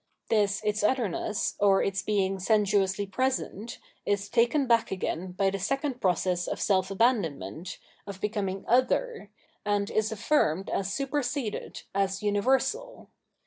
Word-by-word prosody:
This 205 -2 +2
its 210 0 0
otherness, 210 -3 0
or 200 -1 +4
its 195 -1 -1
being 195 -2 0
sensuously 200 -1 +2
present, 235 -1 -2 0.3
is 200 0 -1
taken 240 +5 +3
back 235 -2 +3
again 185 -1 -3
by 195 +1 +1
the 195 - -3
second 270 - -2
process 180 -1 +1
of - - -3
self 190 -3 +2
abandonment, 190 - 0 0.3
of 200 -2 -7
becoming 200 -2 -2
" - - -21
other,'' 465 - -2 0.3
and 205 -1 0
is 215 0 +1
affirmed 200 - +1
as 195 0 -1
superseded, 275 -2 -3
as 195 0 0
universal. 265 - 0
205 Hz, 135 wpm, -28 LUFS, 195-240 Hz, 0.3 s, or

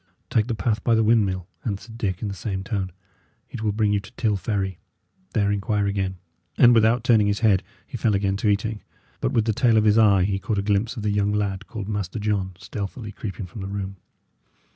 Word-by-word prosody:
"Take 110 0 +2
the 120 - -1
path 105 +1 -1
by 115 - +3
the 110 - +3
windmill," 100 -5 +2 0.2
answered 110 +1 -5
Dick, 100 -5 -2
in - - -1
the 100 - -3
same 95 0 -4
tone; 95 -3 -2 0.6
"it 120 - -6
will 110 -1 +1
bring 105 0 +1
you 100 - +2
to 100 +1 -12
Till 110 -3 +1
Ferry; 95 -2 -2 0.6
there 100 -2 +2
inquire 100 +1 0
again." 100 -1 -1 0.4
And 120 -1 +7
without 115 +1 +4
turning 115 -4 +4
his 105 +1 0
head, 100 -5 +4 0.2
he 125 - -6
fell 110 -2 +2
again 100 0 +1
to 105 - +1
eating. 105 +1 0 0.4
But - - 0
with 110 - +2
the 110 - +1
tail 115 0 +3
of 110 - +4
his 105 +1 +5
eye 100 -4 +5
he 95 +1 0
caught 100 +2 -2
a 100 - 0
glimpse 105 +4 0
of 110 - -4
the 105 - +1
young 100 0 +1
lad 100 -2 -1
called 110 -4 -6
Master 105 -1 -3
John 100 -3 -1
stealthily 105 +4 -6
creeping 100 -1 -6
from 90 +4 -9
the 95 - -4
room. 100 -1 -4
105 Hz, 225 wpm, -24 LUFS, 100-110 Hz, 0.6 s, And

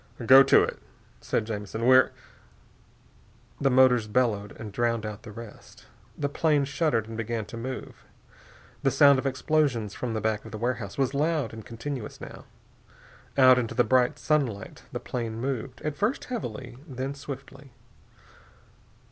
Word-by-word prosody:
"Go 130 +3 +9
to 135 - +6
it," - - -4 0.4
said 110 - -1
Jamison. 110 +1 -4
"We're 130 +1 +6 0.8
" - - -28
The 140 - +3
motors 125 -3 +4
bellowed 105 -3 0
and 110 -2 -7
drowned 115 +1 0
out 105 -1 -6
the 105 - -10
rest. 115 0 -12 0.3
The 145 - -1
plane 145 0 +1
shuddered 140 -6 0
and 115 - -7
began 115 0 -3
to 110 - -10
move. 130 +3 -7 0.8
The 135 - +3
sound 140 0 +6
of 135 - -2
explosions 135 -6 0
from 120 -3 -4
the - - 0
back 110 0 -1
of 110 - -11
the 110 - -5
warehouse 115 -3 -3
was 135 -1 +1
loud 150 -4 0
and 110 -1 -8
continuous, 120 +1 -6
now. - - -10 0.9
Out 130 -1 +7
into 115 -2 -3
the 125 - +4
bright 125 -1 +2
sunlight 135 -10 -1
the - - -4
plane 115 -2 -4
moved, 130 -1 -4
at 150 -1 -2
first 215 - -1
heavily, 125 - -6
then 135 0 -4
swiftly.... 135 0 -9
125 Hz, 155 wpm, -27 LUFS, 110-135 Hz, 0.9 s, Go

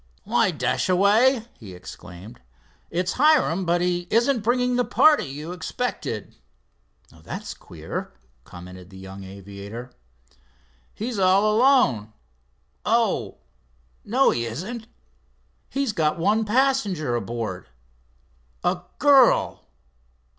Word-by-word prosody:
"Why - - +2
Dashaway," 215 +7 +2
he 95 -5 -10
exclaimed, 90 +4 -11 0.5
"it's 180 +2 -1
Hiram, 275 - +4
but 175 +1 +1
he 175 0 -1
isn't 235 +2 +2
bringing 250 +3 +1
the 245 - +2
party 305 +4 +4
you 150 +5 -7
expected." 180 - -4 0.7
"That's 80 -1 -8
queer," - - -7 0.3
commented 90 +2 -12
the 95 - -13
young 95 +1 -9
aviator. 100 +5 -9 1.0
"He's 225 0 -4
all 195 +3 +4
alone—oh, 105 - 0 0.7
no, 255 +6 +3
he 120 - -1
isn't. 200 - -6 0.8
He's 275 -5 -1
got 155 -3 +1
one 210 +6 +2
passenger 210 - +1
aboard—a 65 - -6 0.2
girl." 275 -4 +4
170 Hz, 95 wpm, -24 LUFS, -, 1.0 s, Hiram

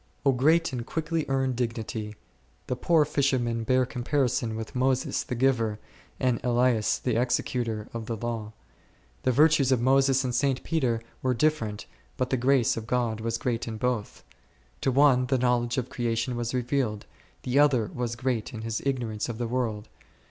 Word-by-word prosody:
O 135 - +6
great 155 +5 +3
and 120 -2 -3
quickly 160 +3 -2
earned 135 -1 0
dignity! 115 -3 -3 0.5
The 125 - -2
poor 155 +4 +3
fishermen 125 -5 0
bear 130 +2 +2
comparison 125 -2 -1
with 110 +3 -6
Moses 130 0 +1
the 125 - -4
giver, 115 -4 +1 0.4
and 125 -3 0
Elias 120 -2 +2
the 120 -2 0
executor, 115 -3 -1
of 115 -1 -5
the 115 - -3
law. 115 -1 -4 0.7
The 130 - +2
virtues 145 0 +4
of 130 - +3
Moses 135 +1 +3
and 125 -1 -2
St. 135 -1 +1
Peter 130 -8 0 0.2
were 130 -1 +1
different, 115 -6 0 0.3
but 130 0 -1
the - - +3
grace 125 -1 +3
of 115 -1 -6
God 115 -2 0
was 115 0 -1
great 120 -1 -2
in 110 -1 -4
both; 120 -2 -2 0.6
to 135 - +1
one 130 -2 +4
the 135 - +2
knowledge 125 0 +1
of 125 -1 -2
creation 120 +1 -1
was 120 0 -2
revealed; 125 -4 -1 0.4
the 130 +3 +1
other 130 -7 +3
was 120 -1 -3
great 120 -2 -2
in 110 - -6
his 115 0 -3
ignorance 120 -6 -2
of 115 - -4
the 120 0 -2
world. 115 -4 -2
125 Hz, 170 wpm, -27 LUFS, 115-135 Hz, 0.7 s, O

